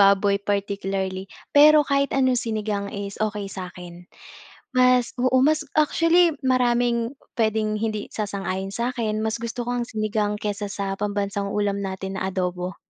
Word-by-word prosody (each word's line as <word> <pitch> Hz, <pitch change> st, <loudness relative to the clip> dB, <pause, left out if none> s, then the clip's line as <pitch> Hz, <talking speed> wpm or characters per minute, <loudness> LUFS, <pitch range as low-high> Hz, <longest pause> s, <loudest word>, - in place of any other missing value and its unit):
baboy 200 Hz, 0 st, +5 dB
particularly. 195 Hz, -1 st, -2 dB, 0.3 s
Pero 305 Hz, +1 st, +8 dB
kahit 280 Hz, 0 st, +2 dB
anong 260 Hz, -3 st, +3 dB
sinigang 215 Hz, -3 st, -2 dB
is 200 Hz, 0 st, -6 dB
okey 210 Hz, -1 st, -4 dB
sa'kin. 180 Hz, -1 st, -8 dB, 0.8 s
Mas 250 Hz, -1 st, +4 dB
oo, 255 Hz, +1 st, +2 dB
mas 310 Hz, 0 st, +1 dB, 0.2 s
actually, 330 Hz, +3 st, +4 dB, 0.2 s
maraming 245 Hz, -1 st, +1 dB, 0.2 s
puwedeng 220 Hz, -1 st, +1 dB
hindi 215 Hz, -2 st, -1 dB
sasang-ayon 195 Hz, -2 st, -3 dB
sa'kin, 235 Hz, -3 st, -1 dB
mas 220 Hz, +1 st, -2 dB
gusto 235 Hz, +1 st, -4 dB
ko 245 Hz, -, -3 dB
ang -, -, -1 dB
sinigang 215 Hz, -1 st, -1 dB
kaysa 205 Hz, 0 st, -3 dB
sa 200 Hz, -1 st, -3 dB
pambansang 200 Hz, -1 st, -1 dB
ulam 200 Hz, -1 st, 0 dB
natin 190 Hz, 0 st, -4 dB
na 190 Hz, -, -1 dB
adobo. 180 Hz, -1 st, -3 dB
210 Hz, 140 wpm, -24 LUFS, 200-240 Hz, 0.8 s, Pero